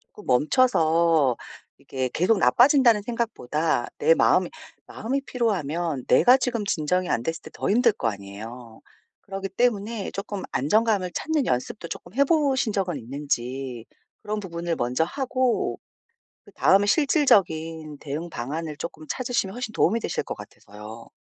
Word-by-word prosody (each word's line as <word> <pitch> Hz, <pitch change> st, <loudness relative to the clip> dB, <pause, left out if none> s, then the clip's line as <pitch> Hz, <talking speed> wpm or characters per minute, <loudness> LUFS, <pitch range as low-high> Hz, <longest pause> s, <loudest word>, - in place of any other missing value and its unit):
쪼끔 210 Hz, -, -17 dB
멈춰서 160 Hz, -, +3 dB, 0.4 s
이게 130 Hz, -1 st, -3 dB
'계속 195 Hz, +6 st, +2 dB
나빠진다.'는 245 Hz, -3 st, +5 dB
생각보다 200 Hz, -, -1 dB
내 485 Hz, -, +5 dB
마음이 -, -, +3 dB, 0.4 s
마음이 265 Hz, +5 st, -3 dB
피로하면 170 Hz, -, -2 dB
내가 250 Hz, +2 st, +6 dB
지금 240 Hz, -4 st, -1 dB
진정이 180 Hz, +1 st, 0 dB
안 115 Hz, -, +1 dB
됐을 165 Hz, 0 st, -3 dB
때 -, -, -11 dB
더 -, -, -3 dB
힘들 235 Hz, +3 st, +4 dB
거 115 Hz, -, -2 dB
아니에요. 110 Hz, +4 st, -8 dB, 0.4 s
그렇기 195 Hz, -1 st, -5 dB
때문에 220 Hz, -1 st, -1 dB
쪼끔 200 Hz, 0 st, -5 dB
안정감을 200 Hz, -, +1 dB
찾는 310 Hz, -4 st, -1 dB
연습도 130 Hz, -, -2 dB
쪼끔 175 Hz, +4 st, -8 dB
해 280 Hz, -, +3 dB
보신 275 Hz, -7 st, +1 dB
적은 185 Hz, -6 st, -1 dB
있는지 130 Hz, -1 st, -4 dB, 0.4 s
그런 215 Hz, +1 st, -3 dB
부분을 170 Hz, -3 st, -4 dB
먼저 125 Hz, +5 st, 0 dB
하고 255 Hz, +3 st, -1 dB, 0.7 s
그다음에 200 Hz, +2 st, +3 dB
실질적인 165 Hz, -, +2 dB
대응 155 Hz, +4 st, -5 dB
방안을 150 Hz, +4 st, -5 dB
쪼끔 155 Hz, -1 st, -7 dB
찾으시면 240 Hz, -6 st, -1 dB
훨씬 245 Hz, -3 st, -4 dB
도움이 225 Hz, +6 st, +2 dB
되실 -, -, -2 dB
것 -, -, -6 dB
같아서요. 105 Hz, +3 st, -12 dB
180 Hz, 325 characters per minute, -25 LUFS, 145-230 Hz, 0.7 s, 내가